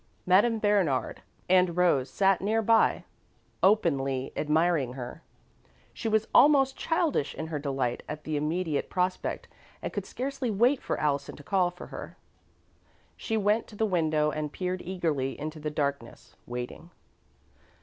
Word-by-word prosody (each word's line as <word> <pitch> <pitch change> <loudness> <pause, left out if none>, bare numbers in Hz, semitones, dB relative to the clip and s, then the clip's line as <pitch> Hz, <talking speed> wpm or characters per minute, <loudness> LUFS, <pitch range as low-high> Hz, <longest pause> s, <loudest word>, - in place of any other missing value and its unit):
Madame 205 +6 +4
Bernard 200 -11 +1 0.3
and 180 -2 +3
Rose 145 -8 +3
sat 195 +6 +2
near 220 +3 +1
by, 225 +1 +3 0.6
openly 135 -10 +2
admiring 155 -4 +1
her. 130 +4 -7 0.7
She 230 - -4
was 220 0 +1
almost 270 -2 +6
childish 325 - 0
in 160 - -4
her 155 -2 -3
delight 135 -4 -2
at 150 0 -6
the 155 - -3
immediate 155 +1 -1
prospect 185 0 -2 0.3
and - - -5
could - - -4
scarcely 265 -1 -3
wait 240 +6 +2
for - - -2
Allison 140 -2 -1
to 145 - -13
call 185 +1 +2
for 180 +1 -11
her. - - -8 1.0
She 225 - -2
went 210 +2 +1
to 215 - -13
the 220 - +1
window 155 -5 +1
and 150 0 -3
peered 185 +2 -3
eagerly 160 -7 -2
into 155 +2 -5
the 150 0 -3
darkness, 140 -5 -4
waiting. 125 +7 -6
175 Hz, 145 wpm, -28 LUFS, 145-205 Hz, 1.0 s, almost